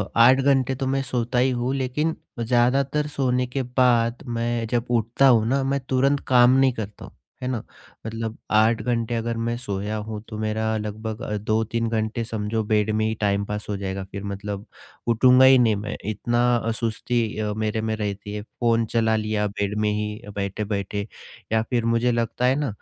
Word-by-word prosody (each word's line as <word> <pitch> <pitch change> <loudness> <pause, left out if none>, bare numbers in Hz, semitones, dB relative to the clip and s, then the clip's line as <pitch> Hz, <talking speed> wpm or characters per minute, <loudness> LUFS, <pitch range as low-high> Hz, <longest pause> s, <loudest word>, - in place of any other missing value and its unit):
8 125 +3 +6
घंटे 135 -1 +2
तो 135 0 -3
मैं 135 0 +1
सोता 125 -1 -1
ही 130 - +3
हूँ 130 +2 0
लेकिन, 140 +5 -1 0.2
ज़्यादातर 130 +5 +2
सोने 125 -3 0
के 130 +2 -2
बाद 125 -1 +2
मैं 120 -1 -1
जब 120 +1 0
उठता 120 +3 +3
हूँ 115 -4 +5
ना, 135 +3 +1
मैं 140 +1 0
तुरंत 135 +2 +2
काम 125 -1 +6
नहीं 135 -2 +4
करता 105 -3 -7
हूँ, - - -15 0.3
है 125 - -3
ना? 125 -4 -2 0.4
मतलब 115 0 -4
8 110 +1 +4
घंटे 115 0 -1
अगर 115 0 -2
मैं 115 +1 -1
सोया 105 -3 -3
हूँ, 105 0 -5
तो 110 - -7
मेरा 110 +1 -1
लगभग 110 +2 -5 0.2
2-3 110 +2 0
घंटे 110 +1 -1
समझो 110 0 -2
बेड 105 0 +1
में 110 0 +1
ही 110 - 0
टाइम 100 0 +1
पास 105 0 -4
हो 100 - -1
जाएगा 95 0 -4
फिर 100 0 -6
मतलब 100 +1 -5 0.4
उठूँगा 125 +3 +6
ही 130 0 +8
नहीं 115 -4 +4
मैं, 100 +1 -4
इतना 120 +3 +1
अ, 115 0 -1
सुस्ती 110 -1 -1
मेरे 110 0 -1
में 110 0 -1
रहती 105 -1 -4
है 105 - -4
फ़ोन 115 +1 0
चला 110 0 +1
लिया 110 -1 0
बेड 100 +1 -3
में 105 0 +2
ही 105 +1 -3
बैठे-बैठे, 100 0 -3 0.4
या 110 0 +3
फिर 120 -3 0
मुझे 115 +1 +2
लगता 120 +1 -1
है 130 +1 +4
ना 145 0 -1
115 Hz, 185 wpm, -24 LUFS, 105-125 Hz, 0.4 s, ही